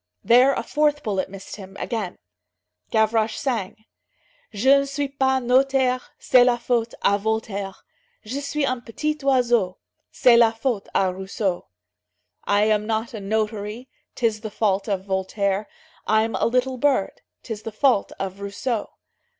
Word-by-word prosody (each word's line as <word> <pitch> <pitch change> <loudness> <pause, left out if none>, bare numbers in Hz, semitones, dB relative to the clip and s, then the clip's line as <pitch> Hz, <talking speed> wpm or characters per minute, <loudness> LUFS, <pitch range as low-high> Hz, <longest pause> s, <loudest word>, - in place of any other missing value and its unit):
There 250 +4 +6
a - - -2
fourth 295 -1 +1
bullet 195 -4 -1
missed 195 +1 -9
him, 195 -1 -11
again. 215 -7 -3 0.7
Gavroche 220 0 +2
sang: 220 -4 -3 0.7
"Je 265 +7 +4
ne 275 - -1
suis 280 +1 -2
pas 265 -1 +1
notaire, 255 0 +2 0.2
C'est 250 -1 +5
la 245 -1 +3
faute 235 -1 -1
à 200 0 +4
Voltaire; 205 -2 -3 0.4
Je 255 +6 -4
suis 285 +1 -1
un 255 -2 -1
petit 300 +6 -2
oiseau, 240 -8 +2 0.3
C'est 240 -2 +5
la 230 -1 +5
faute 225 -2 -2
à 190 -1 +3
Rousseau." 190 -1 -3 0.8
"I 205 +1 +3
am 210 0 +1
not 225 +1 -2
a 220 - -5
notary, 215 +3 -3 0.3
'Tis 225 -3 0
the 220 - -5
fault 205 -1 0
of 190 -2 -2
Voltaire; 195 +1 -1 0.4
I'm 220 +1 +2
a - - 0
little 255 +2 0
bird, 260 -6 +1 0.2
'Tis 220 -3 -6
the 225 - -6
fault 240 -1 +2
of 195 0 -4
Rousseau." 205 +3 -3
225 Hz, 150 wpm, -23 LUFS, 200-255 Hz, 0.8 s, There